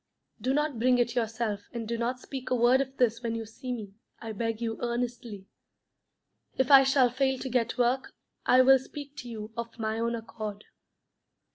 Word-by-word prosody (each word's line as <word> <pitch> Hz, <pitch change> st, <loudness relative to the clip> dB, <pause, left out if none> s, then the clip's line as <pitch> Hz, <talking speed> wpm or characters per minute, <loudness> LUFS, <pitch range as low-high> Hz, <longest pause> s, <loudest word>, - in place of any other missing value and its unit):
Do 255 Hz, -, 0 dB
not 295 Hz, -5 st, 0 dB
bring 250 Hz, +1 st, +4 dB
it 240 Hz, -1 st, +1 dB
yourself, 225 Hz, -3 st, -2 dB
and 230 Hz, -2 st, -4 dB
do 235 Hz, -, -1 dB
not 240 Hz, +2 st, -2 dB
speak 260 Hz, 0 st, -7 dB
a 255 Hz, -, +2 dB
word 245 Hz, +2 st, +4 dB
of 270 Hz, 0 st, -5 dB
this 235 Hz, -2 st, +2 dB
when 230 Hz, -1 st, -2 dB
you 225 Hz, -1 st, -4 dB
see 250 Hz, +4 st, -7 dB
me, 215 Hz, -5 st, -5 dB, 0.3 s
I 225 Hz, -, -6 dB
beg 225 Hz, +1 st, -2 dB
you 225 Hz, -1 st, -3 dB
earnestly. 235 Hz, -4 st, -3 dB, 1.1 s
If 265 Hz, +1 st, +2 dB
I 275 Hz, -1 st, +10 dB
shall 265 Hz, -2 st, +4 dB
fail 265 Hz, +1 st, +1 dB
to 260 Hz, -, -5 dB
get 240 Hz, -1 st, 0 dB
work, 250 Hz, +2 st, +1 dB, 0.3 s
I 255 Hz, +1 st, +6 dB
will 265 Hz, +1 st, +7 dB
speak 285 Hz, +2 st, -9 dB
to 245 Hz, -, -7 dB
you 215 Hz, -1 st, -7 dB
of 235 Hz, 0 st, -6 dB
my 220 Hz, -1 st, -2 dB
own 235 Hz, +1 st, 0 dB
accord. 215 Hz, -2 st, -7 dB
240 Hz, 190 wpm, -28 LUFS, 225-255 Hz, 1.1 s, I